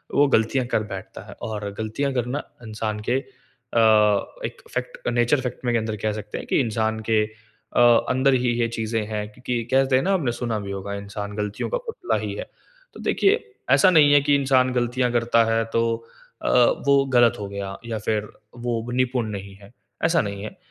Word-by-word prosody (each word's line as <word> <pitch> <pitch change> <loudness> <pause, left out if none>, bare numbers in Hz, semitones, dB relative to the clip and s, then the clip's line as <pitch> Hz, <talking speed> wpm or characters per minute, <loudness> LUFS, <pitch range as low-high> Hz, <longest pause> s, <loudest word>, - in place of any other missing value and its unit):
वो 145 +1 +5
गलतियाँ 115 +4 +2
कर 110 - 0
बैठता 95 - -8
है - - -9
और 105 -2 -4
गलतियाँ 110 +6 -2
करना 125 +3 -2 0.2
इंसान 110 -1 -4
के, 125 - +3 0.6
अ, 115 - +3 0.7
एक - - -7
फैक्ट - - -5
नेचर 120 +3 +2
फैक्ट 125 0 -5
में 120 - +1
के - - +3
अंदर 110 -1 -3
कह 110 - +1
सकते 105 0 -7
हैं - - -7
कि - - +2
इंसान 110 -2 -1
के 110 -1 +4 0.5
अ, - - +3 0.3
अंदर 130 +1 +3
ही 125 -1 +2
ये 115 - +2
चीज़ें 110 -1 -2
हैं। 105 -1 -3
क्योंकि 125 +1 -3
कहते 135 0 +3
हैं 130 - +3
ना 195 - +1
आपने 155 -10 +1
सुना 120 -2 -2
भी 100 -1 -6
होगा 100 +1 -5
इंसान 100 0 -6
गलतियों 105 -1 -3
का - - 0
पुतला 455 - -2
ही - - -4
है। - - -5 0.5
तो - - -12
देखिए 395 - +3 0.4
ऐसा 190 - +6
नहीं 150 -4 +6
है 145 - +6
कि 145 0 +3
इंसान 130 -2 +3
गलतियाँ 125 0 0
करता 115 -1 +3
है 115 0 +2
तो 115 - +3 0.6
अ, - - -1 0.4
वो 140 -1 +5
गलत 120 -2 +6
हो 100 - -4
गया 100 -1 -5
या 115 -1 -3
फिर 105 0 -1 0.4
वो 120 0 -2
निपुण 125 -2 0
नहीं 100 -1 -7
है, 100 +1 -16 0.3
ऐसा 165 0 +3
नहीं 100 -1 -5
है। 110 - -4
अ, - - -21
115 Hz, 205 wpm, -23 LUFS, 105-130 Hz, 0.7 s, ऐसा